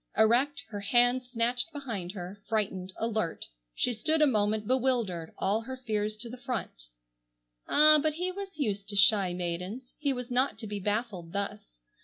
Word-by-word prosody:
Erect, 260 +6 +3
her 205 -2 -5
hands 245 +4 +2
snatched 245 +5 +1
behind 230 - -5
her, 190 +1 -7
frightened, 195 -4 -1
alert, 220 -7 -1 0.3
she 245 - +1
stood 310 +8 +1
a 305 - +6
moment 215 -4 +1
bewildered, 235 -10 0
all 205 +3 +1
her 260 +3 -6
fears 215 -4 -2
to 215 - -6
the 245 +2 -9
front. 210 - -5 0.8
Ah! 305 +1 +7
but 310 0 +1
he 360 +4 -2
was 390 -2 -7
used 205 -8 -2
to 205 - -3
shy 200 -2 +5
maidens. 180 +8 -4
He 290 -2 +1
was 250 -1 -4
not 255 +3 +1
to 225 - -7
be 205 -1 -4
baffled 205 -4 -2
thus. 200 0 -2
225 Hz, 170 wpm, -29 LUFS, 200-255 Hz, 0.8 s, Ah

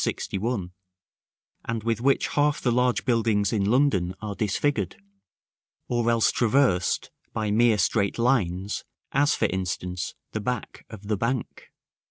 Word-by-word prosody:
61, 100 -3 -2 0.9
and 115 -2 -3
with 115 0 -1
which 135 +2 +2
half 145 0 +2
the 125 - +1
large 125 +1 +1
buildings 110 -5 +2
in 105 -3 +1
London 105 -9 +2
are 105 -1 -4
disfigured, 105 - -1 0.9
or 120 -1 +1
else 115 -1 +3
traversed 120 -6 +2 0.2
by 105 -1 -1
mere 115 0 +4
straight 100 +1 +1
lines, 105 -6 0 0.3
as, 145 +3 +3
for - - +1
instance, 90 -1 -3 0.2
the 110 - -3
back 125 +3 -4
of 105 -2 -10
the 105 -1 0
Bank. 115 +4 -3
110 Hz, 135 wpm, -26 LUFS, 100-125 Hz, 0.9 s, mere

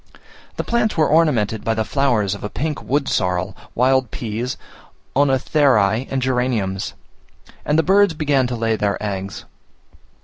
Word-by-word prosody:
The - - -2
plains 235 -4 0
were 155 - +4
ornamented 125 -10 +2
by 115 - 0
the 110 0 -1
flowers 120 -9 +1
of 100 - -8
a 105 - -3
pink 150 +5 -3
wood 140 +1 -1
sorrel, 90 +1 -1 0.2
wild 130 0 +2
peas, 115 +3 -4 0.6
cenotherae, 135 -5 +2
and 135 - -1
geraniums; 125 -7 -1 0.7
and 150 - +1
the 160 - +4
birds 195 0 +4
began 145 -4 +1
to 120 - -3
lay 115 -1 0
their 100 -2 0
eggs. 100 -2 -5
125 Hz, 145 wpm, -20 LUFS, 105-145 Hz, 0.7 s, were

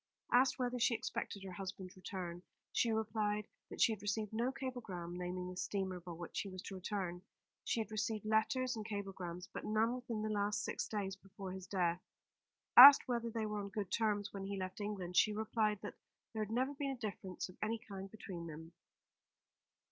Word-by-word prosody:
Asked 255 +2 +5
whether 250 -1 -1
she 230 0 +4
expected 205 -2 -4
her 190 - -6
husband's 185 0 -6
return, 180 -2 -5 0.3
she 230 - +2
replied 210 -1 0 0.2
that - - -8
she - - +6
had 215 -3 -4
received 210 +1 -1
no 235 +4 +1
cablegram 235 -11 -5
naming 180 0 -3
the - - -8
steamer 190 -2 -2
by 175 0 -7
which 170 0 -5
he 200 - -3
was 185 -1 -7
to - - -6
return. 185 -2 -3 0.4
She 230 - +1
had 220 - -6
received 215 -1 -1
letters 245 +4 +2
and 220 - -4
cablegrams, 190 -4 -5
but - - -5
none 220 +2 +2
within 245 -4 -3
the 215 - -1
last 205 0 0
six - - -2
days 200 -3 -2
before 195 -1 -8
his 190 0 -7
death. 175 -2 +1 0.7
Asked 280 +3 +12
whether 235 -2 0
they 225 -1 -2
were 210 0 -2
on 200 0 -4
good 200 -2 -4
terms 210 -3 +1
when 195 -1 -4
he 200 0 -3
left 185 +2 -4
England, 190 -4 -3
she 215 - +6
replied 215 -1 +1
that - - -5 0.4
there 220 -1 -1
had 210 - -6
never 260 +4 +1
been 280 0 -2
a 270 - -2
difference 195 -5 -4
of 185 - -14
any 225 +2 0
kind 195 -3 -8
between 190 -5 -7
them. 160 +1 -8
205 Hz, 195 wpm, -37 LUFS, 185-220 Hz, 0.7 s, Asked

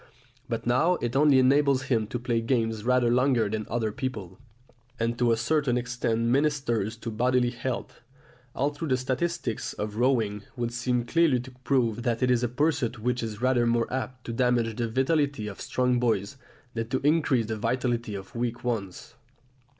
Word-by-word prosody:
But 115 -2 -3
now 150 +9 +3
it 120 -5 -3
only 145 -1 +5
enables 135 +1 +4
him 115 -5 0
to 120 - -3
play 120 -1 -1
games 115 -3 0
rather 125 -1 +3
longer 125 -3 +3
than 110 +1 -3
other 115 -2 -1
people, 105 -7 -5 0.6
and 115 +1 0
to 120 -1 +3
a 115 - +2
certain 125 +1 +1
extent 120 -2 -1
ministers 120 -4 +1
to 115 0 -5
bodily 125 +2 +2
health, 120 0 -5 0.5
although 145 +4 -1
the 130 -2 +2
statistics 130 0 -2
of 105 0 -5
rowing 115 -5 +1
would 120 -1 -3
seem 120 0 0
clearly 165 -3 +3
to 130 +1 -11
prove 120 -5 +1
that 120 +1 -1
it 125 - +3
is 120 -1 +3
a 120 - 0
pursuit 135 -2 0
which 125 +3 -1
is 110 0 -5
rather 125 -2 +3
more 115 0 +2
apt 130 -1 -4
to 115 - -4
damage 120 -2 +1
the 115 0 -2
vitality 140 -1 +1
of 100 - -8
strong 125 -1 +1
boys 115 0 0 0.4
than 115 -1 -3
to 130 - 0
increase 145 -6 +3
the 110 0 -3
vitality 120 -1 -1
of 95 -1 -8
weak 120 0 -3
ones. 105 -7 -4
120 Hz, 175 wpm, -27 LUFS, 115-130 Hz, 0.6 s, only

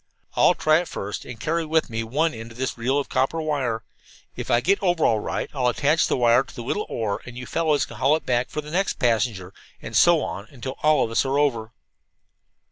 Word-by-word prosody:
I'll - - +5
try 155 +1 +3
it 175 - -4
first, 100 +1 -5
and 125 -3 -9
carry 165 +5 -1
with 160 0 +1
me 115 -1 -3
one 150 +9 0
end 115 0 -8
of - - -16
this 130 0 -2
reel 125 +4 0
of 145 - -1
copper 135 +5 0
wire. 135 -8 -1 0.5
If - - -6
I 120 - +4
get 190 +11 +1
over 175 -4 +2
all 110 - +3
right - - -3
I'll 130 -3 0
attach 145 +6 +2
the - - 0
wire 120 0 +5
to 135 - -11
the 120 - -6
little 205 - -2
oar 110 -3 -2
and 120 0 -9
you 125 - -6
fellows 155 -2 +1
can 120 - -11
haul 135 +5 +3
it 160 - -5
back 125 0 0
for 150 - -4
the 150 0 -10
next 195 +4 +1
passenger, 110 - 0 0.3
and - - -8
so - - +5
on 100 +2 -5
until 130 0 -7
all 155 0 +4
of 115 - -7
us 115 - +2
are 135 +1 0
over." 120 -6 0
130 Hz, 235 wpm, -24 LUFS, 115-155 Hz, 0.5 s, I'll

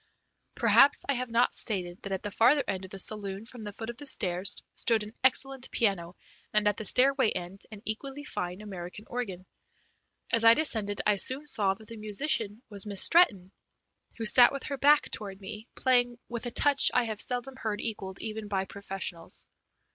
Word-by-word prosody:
Perhaps 285 - +4
I 280 - +2
have 250 -1 -2
not 235 +2 +2
stated 180 -5 -2
that 195 - -5
at 190 - -3
the 205 - -4
farther 260 +7 +4
end 190 0 -3
of - - -12
the 195 - -8
saloon 200 +1 -2
from 235 -1 -8
the 205 - -6
foot 225 +3 -6
of 235 - -17
the 290 - -6
stairs 185 -6 +2
stood 225 -2 +1
an 210 +1 -10
excellent 265 0 +1
piano, 185 -6 -1 0.4
and 210 -1 +3
at 205 - +1
the 220 - -5
stairway 260 +2 +4
end 180 +1 -6
an 210 -1 -11
equally 270 +6 -5
fine 180 -6 -5
American 195 0 -8
organ. 200 -8 -5 0.9
As 230 -1 +3
I 230 0 +8
descended 215 -10 0
I 210 -1 +3
soon 260 +8 0
saw 200 -9 0
that 215 +2 -17
the 230 -1 -9
musician 215 0 -2
was 205 -1 -3
Miss 200 -2 +3
Stretton, 205 - +3 0.7
who 225 - -4
sat 245 +3 +7
with 275 -1 -5
her 280 - -4
back 295 +2 +4
toward 195 -3 -6
me, 210 +3 -9
playing 245 -2 +2
with 240 0 -4
a - - -5
touch 285 +3 +4
I 250 - +4
have 220 -3 -1
seldom 250 +1 0
heard 215 -4 -3
equalled 195 -4 -5
even 220 -1 -5
by 195 -2 -1
professionals. 195 -3 -6
215 Hz, 195 wpm, -28 LUFS, 195-250 Hz, 0.9 s, I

